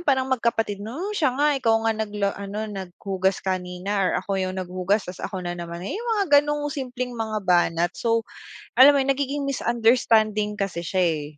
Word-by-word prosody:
yung 345 - -9
parang 265 -1 +2
magkapatid? 225 -4 0
'No, 310 - -5
siya 295 -10 +1
nga, 295 +1 +3
ikaw 225 -3 +3
nga 225 - +3
nagla 210 -2 -2
ano, 205 +2 -4
naghugas 190 -1 -3
kanina 185 +1 -2
or 185 - +2
ako - - -8
yung 185 0 -2
naghugas 185 +2 -1
ta's 180 +1 -8
ako 190 -2 -5
na 175 - -2
naman. 170 0 -7
Yung 460 - -4
mga 305 -9 +5
ganong 295 0 -2
simpleng 255 -2 -4
mga 220 -3 -3
banat. 175 -1 +2
So 230 -1 0 0.5
alam 280 +3 +9
mo 280 - +3
yun, 270 - -2
nagiging 280 +1 0
misunderstanding 225 -4 +2
kasi 195 -4 -3
siya, 185 +3 0
eh. 160 -4 +1
215 Hz, 185 wpm, -24 LUFS, 185-260 Hz, 0.5 s, alam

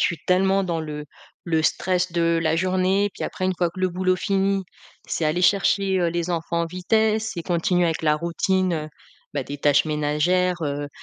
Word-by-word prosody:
suis 170 - 0
tellement 190 +1 +3
dans 170 -2 -2
le 150 -1 -6 0.4
le 160 -2 +1
stress 180 +2 0
de 170 -1 +1
la 160 0 +1
journée. 185 +3 +1
Puis - - -7
après 185 - -3
une 185 0 +1
fois 175 - +1
que 185 - -12
le 185 0 +1
boulot 185 +1 0
fini, 195 0 0 0.4
c'est 160 - -2
aller 165 +4 0
chercher, 195 0 +3
heu, 175 - +2
les 170 +1 -2
enfants 170 0 -1
en - - -1
vitesse 220 +5 0
et 170 - -3
continuer 175 0 +1
avec 165 -2 -1
la 150 -1 +3
routine, 185 +3 0
heu 155 -2 -3 0.5
bah, 140 - -1
des 145 +2 -7
tâches 145 +1 +3
ménagères, 155 +5 +1
heu, 145 -1 -3
175 Hz, 195 wpm, -23 LUFS, 160-185 Hz, 0.5 s, tellement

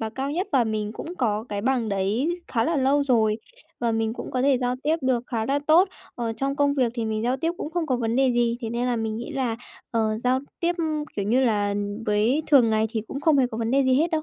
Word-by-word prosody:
là 220 -1 -3
cao 270 +4 -3
nhất, 360 +6 -2
và 255 -4 +4
mình 215 -1 -2
cũng 340 +8 -7
có 220 -3 0
cái 205 -1 -3
bằng 245 -1 0
đấy 200 - 0 0.2
khá 230 -2 +1
là 330 +2 0
lâu 275 +2 +3
rồi 220 -4 +2 0.4
và 235 -1 +1
mình 225 0 0
cũng - - -7
có 255 0 -1
thể 275 -2 +3
giao 250 0 0
tiếp 315 +2 +2
được 255 -2 +1
khá 225 -2 -2
là 280 +1 +1
tốt. 345 +5 +6 0.3
Ờ, 230 -2 -2
trong 275 +4 -1
công 285 -1 +2
việc 250 -4 +1
thì 230 -2 -2
mình 220 0 -2
giao 245 +3 +1
tiếp 325 +5 -1
cũng 305 - -5
không 345 -1 -1
có 255 -4 +1
vấn 230 0 -1
đề 265 -1 +4
gì, 240 -1 +1
thế 225 -1 -4
nên 240 +1 -1
là 245 -1 0
mình 220 -1 -2
nghĩ 240 - -6
là, 245 -4 -1 0.3
ờ, 220 -2 0
giao 255 +3 +1 0.2
tiếp, 345 0 +2 0.4
kiểu 200 - -1
như 240 +6 +2
là, 205 -3 +1 0.3
với 220 +9 +2
thường 255 -7 +5
ngày 220 0 +2
thì 220 -2 -1
cũng 275 - -5
không 300 -2 +3
hề 255 - +4
có 225 -2 -6
vấn 230 0 -1
đề 275 +1 +3
gì 260 -1 +3
hết 325 +6 +2
đâu. 315 -1 0
245 Hz, 270 wpm, -24 LUFS, 225-275 Hz, 0.4 s, tốt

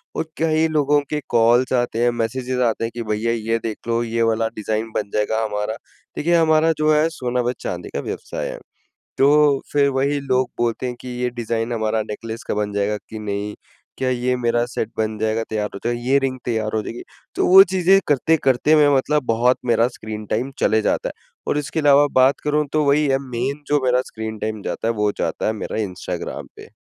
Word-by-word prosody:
और - - 0
कई 160 0 +2
लोगों 150 -2 +2
के 150 - -1
कॉल्स 120 +2 +3
आते 120 -2 0
हैं, 120 - +4
मैसेजेस 125 +2 -2
आते 115 -1 0
हैं 115 - -2
कि 120 - -4
भईया 110 +1 -1
ये 115 0 -1
देख 110 -1 -4
लो 115 0 +1
ये 115 0 -2
वाला 115 0 +1
डिज़ाइन 110 +1 -3
बन 105 -1 -2
जाएगा 105 +1 0
हमारा, 105 0 -2 0.4
देखिए 170 +3 +2
हमारा 160 -1 +4
जो 155 0 +2
है 155 +1 +3
सोना 125 -5 -2
व 120 0 0
चाँदी 90 -1 -5
का - - -2
व्यवसाय - - -5
है। - - -7 0.6
तो 145 0 +4
फिर 145 -1 +3
वही 140 +2 0
लोग 130 -2 0
बोलते 120 +1 -1
हैं 125 - -4
कि - - -9
ये 125 - +1
डिज़ाइन 120 -1 -3
हमारा 110 -1 0
नेकलेस 110 +2 -6
का - - 0
बन 105 -1 -2
जाएगा 100 +1 0
कि 110 - -7
नहीं? 105 0 -3 0.4
क्या 130 -1 0
ये 125 0 0
मेरा 120 -1 +1
सेट 120 -3 -4
बन 110 0 -1
जाएगा 110 +1 0
तैयार 105 -1 -2
हो - - -7
जाएगा? 120 0 0
ये 135 +3 +3
रिंग 135 -1 -2
तैयार 110 -2 -1
हो 110 - +1
जाएगी? 120 - -7 0.3
तो - - +1
वो 190 +1 +10
चीज़ें 190 +1 +5
करते-करते 145 0 +3
मैं 150 -1 +5
मतलब 150 +2 +1
बहुत 120 +2 +2
मेरा 115 -1 +3
स्क्रीन 110 -1 -6
टाइम 125 +5 -1
चले 110 0 +3
जाता - - 0
है - - -16 0.2
और - - +1
इसके 145 +1 -2
अलावा 145 -1 +5
बात 130 +2 +4
करूँ 150 0 +1
तो 155 0 +2
वही 145 +2 +3
है 135 -1 +3
मेन 130 +5 -3
जो 145 -1 +2
मेरा 125 0 +3
स्क्रीन 110 0 -5
टाइम 110 0 -3
जाता - - -3
है 115 - +1
वो 105 -1 +1
जाता - - -2
है 110 - +1
मेरा 110 - -5
इंस्टाग्राम 90 -3 -5
पे। - - -12
120 Hz, 210 wpm, -21 LUFS, 110-140 Hz, 0.6 s, वो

